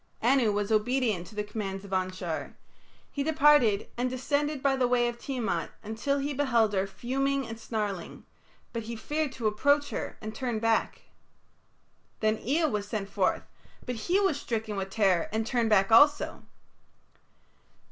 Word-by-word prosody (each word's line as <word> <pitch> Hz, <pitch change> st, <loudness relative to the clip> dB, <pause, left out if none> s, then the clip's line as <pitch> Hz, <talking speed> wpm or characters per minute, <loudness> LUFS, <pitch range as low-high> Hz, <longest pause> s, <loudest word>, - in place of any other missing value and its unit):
Anu 240 Hz, -2 st, +4 dB
was 205 Hz, +1 st, -1 dB
obedient 220 Hz, -4 st, +1 dB
to 215 Hz, -, -13 dB
the 210 Hz, -, -1 dB
commands 200 Hz, -2 st, -5 dB
of 195 Hz, -, -12 dB
Anshar. 185 Hz, -3 st, -3 dB, 0.6 s
He 285 Hz, -, -3 dB
departed, 290 Hz, -8 st, +4 dB
and 250 Hz, +1 st, +1 dB
descended 285 Hz, +2 st, -1 dB
by 275 Hz, -1 st, +3 dB
the 250 Hz, -2 st, +1 dB
path 240 Hz, -1 st, +3 dB
of 235 Hz, -, -19 dB
Tiamat 225 Hz, -11 st, -2 dB
until 225 Hz, +6 st, -1 dB
he 285 Hz, +1 st, -2 dB
beheld 240 Hz, -6 st, +2 dB
her 195 Hz, 0 st, +1 dB
fuming 270 Hz, +6 st, -1 dB
and 225 Hz, 0 st, -7 dB
snarling, 210 Hz, -5 st, -4 dB, 0.5 s
but 230 Hz, -, -2 dB
he 230 Hz, +1 st, -6 dB
feared 295 Hz, +5 st, -2 dB
to 230 Hz, -, -6 dB
approach 285 Hz, +7 st, +2 dB
her, -, -, -4 dB
and 215 Hz, 0 st, -6 dB
turned 235 Hz, -1 st, -2 dB
back. 225 Hz, 0 st, 0 dB, 1.2 s
Then 215 Hz, 0 st, +1 dB
Ea 310 Hz, +7 st, +1 dB
was 210 Hz, -8 st, -1 dB
sent 205 Hz, -2 st, -4 dB
forth, 195 Hz, -2 st, 0 dB, 0.4 s
but 250 Hz, -, -3 dB
he 345 Hz, -, +1 dB
was 350 Hz, -8 st, +1 dB
stricken 220 Hz, -2 st, -3 dB
with 195 Hz, -1 st, -3 dB
terror 195 Hz, -4 st, +2 dB
and 220 Hz, +1 st, -1 dB
turned 235 Hz, -1 st, +1 dB
back 195 Hz, -1 st, +3 dB
also. 290 Hz, +6 st, +5 dB
225 Hz, 160 wpm, -28 LUFS, 210-275 Hz, 1.2 s, also